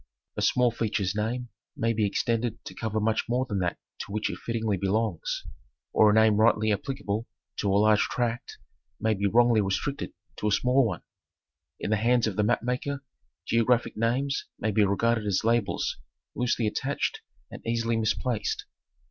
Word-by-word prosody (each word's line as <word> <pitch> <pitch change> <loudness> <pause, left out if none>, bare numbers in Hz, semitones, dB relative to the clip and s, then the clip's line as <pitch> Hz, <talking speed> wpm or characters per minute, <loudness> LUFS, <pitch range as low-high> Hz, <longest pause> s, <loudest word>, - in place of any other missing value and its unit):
A - - -3
small 125 -1 +3
feature's 105 -4 -1
name 120 +3 -2 0.3
may 115 0 +1
be 110 -2 +1
extended 115 +2 -1
to - - -7
cover 110 -1 -2
much 110 +2 0
more 125 +2 +1
than 100 -6 -2
that 90 -2 -1 0.2
to - - -6
which 110 +1 -1
it - - -7
fittingly 115 -3 -1
belongs; 100 -1 -1 0.5
or 110 - +6
a - - +4
name 110 -1 +5
rightly. 110 -1 +4
applicable 110 -2 -3 0.3
to 100 - 0
a 100 - +4
large 105 0 +5
tract 120 0 -2 0.4
may 110 0 +2
be 100 0 0
wrongly 120 +1 +4
restricted 105 +9 -2 0.3
to 105 - -1
a - - +2
small 125 +4 +3
one. - - -5 0.8
In - - -3
the 110 - +3
hands 120 +2 +3
of 110 -4 -2
the 105 - +1
map 120 +4 +1
maker 135 +3 -2 0.4
geographic 115 +1 +2
names 125 +5 0
may 110 - -1
be 105 +1 +3
regarded 110 +2 +1
as 100 0 +1
labels 115 -2 +1 0.4
loosely 120 -2 0
attached 135 +6 -1 0.3
and - - -9
easily 115 0 0
misplaced. 115 +1 -1
110 Hz, 170 wpm, -27 LUFS, 105-120 Hz, 0.8 s, or